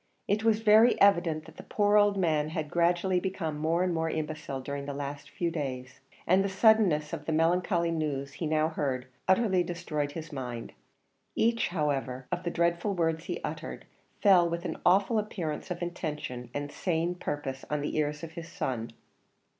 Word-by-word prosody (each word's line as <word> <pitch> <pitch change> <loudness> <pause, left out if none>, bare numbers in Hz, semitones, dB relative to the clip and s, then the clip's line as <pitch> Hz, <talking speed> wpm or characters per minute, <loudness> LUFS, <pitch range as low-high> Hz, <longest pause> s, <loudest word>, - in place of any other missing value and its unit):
It 210 +2 +1
was 225 -1 +3
very 220 +3 +6
evident 170 -6 +4
that - - -15
the - - -7
poor 205 0 +2
old 205 -1 +5
man 155 -5 +1
had 155 -2 -4
gradually 175 +2 +2
become 170 -5 -3
more 165 +3 +1
and 180 -1 0
more 160 0 0
imbecile 155 -3 -4
during 140 +1 -5
the 140 - -4
last 140 0 -5
few 170 -1 -2
days, 130 -4 -5 0.3
and 185 +3 +4
the 200 - -1
suddenness 190 -7 +3
of 150 -3 -5
the 160 - -1
melancholy 170 +2 +2
news 145 -4 -2
he 160 - -3
now 155 0 +2
heard 135 -5 -2 0.2
utterly 190 -1 +3
destroyed 150 -4 -3
his 165 0 -7
mind. 125 -4 -5 0.6
Each, 230 +1 +2
however, 140 -6 -2
of 175 - -1
the 175 - -2
dreadful 170 +4 0
words 165 -1 0
he - - -3
uttered - - -5 0.4
fell 180 -4 +6
with 170 +1 -4
an - - -3
awful 200 +5 +4
appearance 180 -7 -4
of 180 -1 -3
intention 150 -8 -5
and 145 +2 -4
sane 170 -1 -1
purpose 145 -6 -4
on 150 -1 -1
the 145 - -3
ears 150 0 -1
of 165 - -6
his 165 0 -8
son. 125 - -3
165 Hz, 180 wpm, -29 LUFS, 150-180 Hz, 0.6 s, very